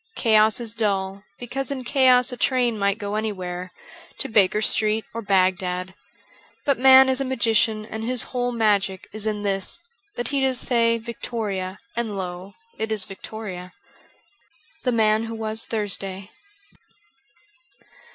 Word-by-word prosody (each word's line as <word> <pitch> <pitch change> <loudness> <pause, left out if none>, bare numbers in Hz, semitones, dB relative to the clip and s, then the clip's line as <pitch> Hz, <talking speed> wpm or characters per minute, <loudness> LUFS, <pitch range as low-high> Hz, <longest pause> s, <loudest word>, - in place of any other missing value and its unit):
Chaos 220 -1 +4
is 230 -2 -3
dull; 195 -3 -1
because 265 +3 -4
in 270 -2 -3
chaos 255 -1 +4
a - - -4
train 245 -3 +1
might 200 0 +1
go 205 -2 -5
anywhere 185 -4 -3 0.2
— - - -21
to - - -1
Baker 210 -3 +3
Street 215 0 +1
or 230 - -4
Bagdad. 185 -2 +1 0.7
But 280 -3 +2
man 265 0 +8
is 260 0 +1
a - - +2
magician 225 -4 +1
and 220 0 -6
his 250 0 0
whole 245 -1 0
magic 205 -5 +1
is 215 0 -2
in 210 -1 -2
this 195 - -1 0.4
that 240 -1 -3
he 280 -1 0
does 260 -2 +1
say 230 -2 +2
'Victoria,' 215 -4 -4 0.2
and 225 -4 -2
lo! 185 +1 -6 0.2
it 220 0 -2
is 210 -3 +1
Victoria. 190 -2 -8 0.6
' 320 -5 -35
The 250 - +3
Man 220 -1 +2
who 225 0 -6
was 220 0 -3
Thursday.' 195 -2 -3
220 Hz, 150 wpm, -23 LUFS, 195-240 Hz, 0.7 s, man